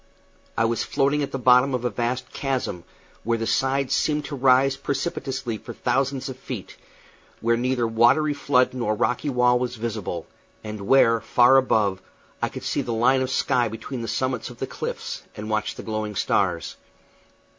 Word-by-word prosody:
I 115 - +3
was 115 0 0
floating 140 +2 +1
at 140 - -3
the - - -2
bottom 125 +1 +4
of 125 -1 -3
a 120 - 0
vast 120 +3 -2
chasm, 130 - -3 0.4
where 115 +1 0
the 115 - -3
sides 135 +3 +1
seemed 150 +1 +1
to 145 - -5
rise 135 +1 +4
precipitously 135 -5 -3
for - - -9
thousands 135 +2 0
of 130 -1 -7
feet, 125 -7 -7 0.6
where 115 +1 +2
neither 125 0 0
watery 120 +7 +3
flood 135 -3 +2
nor 120 -4 -1
rocky 125 +8 0
wall 125 -1 +3
was 125 0 -2
visible, 110 -7 -4 0.4
and 105 -2 -6
where, 115 -4 +5
far 120 +4 +5
above, 105 -7 +2 0.4
I - - 0
could - - -8
see - - -1
the 120 - -4
line 125 +4 +3
of 130 - -1
sky 125 -2 +1
between 115 +3 -6
the 115 - -4
summits 130 +1 -2
of - - -12
the - - -3
cliffs, - - -5 0.2
and 105 +1 -5
watch 110 -1 -1
the - - -8
glowing 110 -1 -3
stars. - - 0
125 Hz, 175 wpm, -24 LUFS, 115-135 Hz, 0.6 s, where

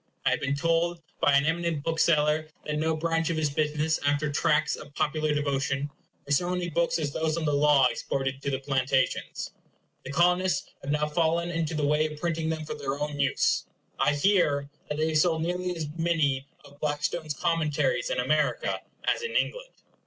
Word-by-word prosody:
I - - +4
have - - +1
been 140 +1 -1
told 165 +3 +1 0.2
by 145 - +4
an 140 - +2
eminent 165 -2 0
bookseller, 155 -1 +2 0.2
that 150 - -2
in 150 - -1
no 160 +1 +1
branch 165 0 0
of 165 - -1
his 155 -2 0
business, 150 +1 0
after 145 +1 +1
tracts 155 0 +2
of 145 - -12
popular 155 0 0
devotion, 140 -1 -1 0.3
were 140 - -7
so 175 +5 +2
many 180 -1 -2
books 170 +2 +1
as 145 -3 -2
those 160 0 0
on 165 - -2
the 150 - +1
law 145 -2 +5
exported 135 +1 -1
to 140 - -2
the 135 - 0
Plantations. 135 0 0 0.5
The 135 - -6
Colonists 180 +3 +2
have 140 - -7
now 150 0 +1
fallen 170 +2 +1
into 165 -1 -2
the 150 -1 0
way 150 +2 +2
of 150 - -9
printing 165 -1 -1
them 160 -1 -3
for - - -4
their 140 -2 -3
own 150 -1 -3
use. 135 -1 +1 0.3
I 150 - +3
hear 145 -5 +2 0.2
that 150 - -2
they 155 +1 +1
have 155 -1 +2
sold 160 0 +2
nearly 180 +1 -2
as 160 -2 -3
many 155 -5 +1 0.2
of 145 0 -17
Blackstone's 150 +1 -2
Commentaries 165 - 0
in - - -1
America - - +1 0.2
as - - +1
in 470 0 -4
England. - - 0
155 Hz, 195 wpm, -27 LUFS, 145-165 Hz, 0.5 s, law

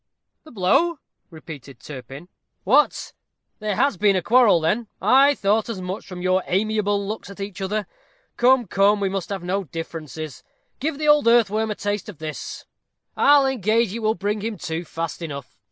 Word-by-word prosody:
"The 310 - -13
blow?" 245 - +2 0.3
repeated 145 -6 -11
Turpin. 135 +3 -10 0.4
"What! 275 +10 +2 0.5
there 210 -2 -2
has 255 -2 +1
been 200 +1 +3
a 185 - 0
quarrel 230 -5 +5
then? 210 +9 0
I 275 +2 +5
thought 210 +2 +1
as 220 -5 -4
much 185 +3 -6
from 180 -2 -7
your 185 +1 +2
amiable 205 0 0
looks 215 -1 -5
at 200 - -11
each 195 0 -6
other. 205 +2 -2 0.5
Come, 250 0 +4
come, 200 +2 +3
we 195 -1 0
must 195 -2 -4
have 195 -3 -4
no 190 +2 -2
differences. 155 -1 -7 0.4
Give 295 +1 -2
the 305 0 -2
old 295 -4 +5
earthworm 220 -2 +3
a 210 - -2
taste 205 +1 -3
of 195 - -10
this 155 0 -7 0.5
I'll 285 -1 +5
engage 230 -4 +1
it 230 - -4
will 220 0 +1
bring 205 +3 -2
him 220 0 -4
to 165 +2 -4
fast 165 +1 -5
enough. 140 -5 -7
200 Hz, 175 wpm, -23 LUFS, 175-225 Hz, 0.5 s, quarrel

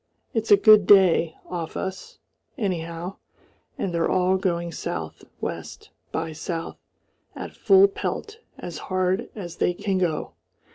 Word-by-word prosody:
It's 225 -1 -1
a 205 - +8
good 210 -1 +7
day 180 -5 +5
off 170 -3 -5
us, 190 0 -5 0.4
anyhow, 175 -4 -3 0.6
and 180 - -2
they're 170 -1 +1
all 185 0 +2
going 170 -3 -1
south - - -5 0.2
west - - -6 0.2
by 160 0 -3
south 165 +1 -5 0.6
at - - -7
full 390 0 +6
pelt 420 +2 -5 0.2
as 170 -3 -7
hard 185 +4 0
as 175 -5 -7
they 180 - +1
can 190 0 -1
go. 165 -4 -1
185 Hz, 135 wpm, -24 LUFS, 170-200 Hz, 0.6 s, a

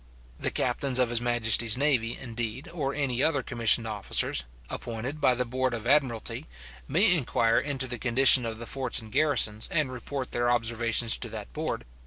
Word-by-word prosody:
The - - 0
captains 130 +1 -1
of 125 -2 +2
his 120 -1 0
majesty's 120 -1 +2
navy, 130 -5 0
indeed, 120 +1 -5
or 140 -5 -3
any 135 -4 -1
other 145 -4 +1
commissioned 115 -1 +2
officers, 105 - -1 0.2
appointed 125 +6 -6
by 125 - +3
the 125 +1 -1
board 130 +1 -2
of 115 -1 -7
admiralty, 130 -4 0 0.4
may 180 +7 +6
inquire 115 -6 +1
into 140 -2 -2
the 125 -2 -5
condition 130 +1 +5
of 115 -1 -5
the 115 - -7
forts 130 0 -2
and 110 -1 -11
garrisons, 130 -6 +1
and 155 -5 0
report 130 +1 -6
their 120 0 0
observations 115 -1 +1
to - - -5
that - - -9
board. - - -4
120 Hz, 175 wpm, -27 LUFS, 115-135 Hz, 0.4 s, may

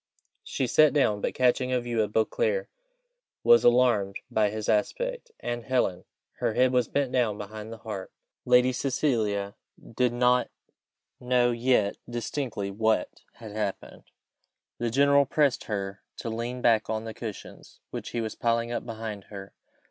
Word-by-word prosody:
She 130 - -2
sat 150 +5 +5
down, 110 -8 +2
but - - -2
catching 125 0 +2
a 125 - +2
view 120 -2 -1
of 105 -1 -1
Beauclerc 480 - 0 0.8
was 235 0 +6
alarmed 120 -5 +3 0.2
by 105 -1 +2
his 110 0 -5
aspect - - -1
and 120 -1 -4
Helen! 110 -8 0 0.3
her - - 0
head 130 0 +4
was 125 -3 +2
bent 140 -3 -1
down 115 -5 +1
behind 105 +2 -8
the 115 - -7
harp. 105 -4 -7 0.3
Lady 125 +1 +4
Cecilia 110 -7 0 0.4
did 125 0 +2
not 125 +1 +2 0.7
know 125 -1 +2
yet 120 -4 +1
distinctly 120 -3 -3
what 110 +2 0
had 110 -2 -10
happened. 105 -2 -4 0.8
The 120 - 0
general 140 +3 +4
pressed 145 -3 +1
her 100 -1 -4 0.2
to 115 - -4
lean 120 +2 -4
back 110 -3 +3
on 110 0 -2
the 110 -1 -6
cushions 110 -3 -9
which - - -5
he 120 - -2
was 110 -1 -3
piling 115 0 0
up 120 - -2
behind 110 -3 -6
her. 100 -2 -10
120 Hz, 155 wpm, -27 LUFS, 110-125 Hz, 0.8 s, was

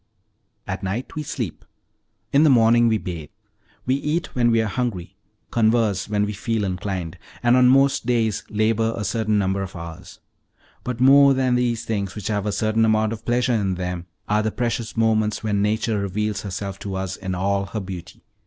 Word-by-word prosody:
At - - -4
night 100 +7 -4
we 155 - -3
sleep; 125 - -5 0.7
in 140 - +5
the 155 - +6
morning 120 -2 +5
we 110 -1 +3
bathe; 85 -7 -6 0.6
we 130 - +2
eat 150 +5 -2
when 120 -2 +2
we 115 -1 +3
are 110 - +1
hungry, 95 -5 -3 0.4
converse 110 -4 +2
when 105 -1 +1
we 105 - -4
feel 110 +1 -2
inclined, 90 -2 -4 0.2
and 120 +1 +5
on 125 -1 +6
most 135 -2 +3
days 115 -4 +1
labor 110 +1 +1
a - - -3
certain 105 +2 0
number 95 -1 0
of 95 -1 -6
hours. 85 -1 -9 0.6
But 125 -1 -4
more 140 +1 +7
than 130 -1 +1
these 120 -2 0
things, 100 -5 -2
which 105 0 -5
have 105 -1 -1
a - - +1
certain 110 +2 +1
amount 110 0 +2
of 110 - -9
pleasure 120 +1 +1
in 100 -4 0
them, 90 -1 -4 0.2
are 105 +1 +2
the 110 - 0
precious 115 0 -3
moments 110 -1 +1
when 105 -2 0
nature 110 +1 0
reveals 100 +1 -2
herself 100 0 -5
to 100 -2 -5
us 95 0 -3
in 95 -1 -4
all 100 +2 0
her 110 +2 -4
beauty. 95 -3 -8
110 Hz, 190 wpm, -22 LUFS, 95-120 Hz, 0.7 s, more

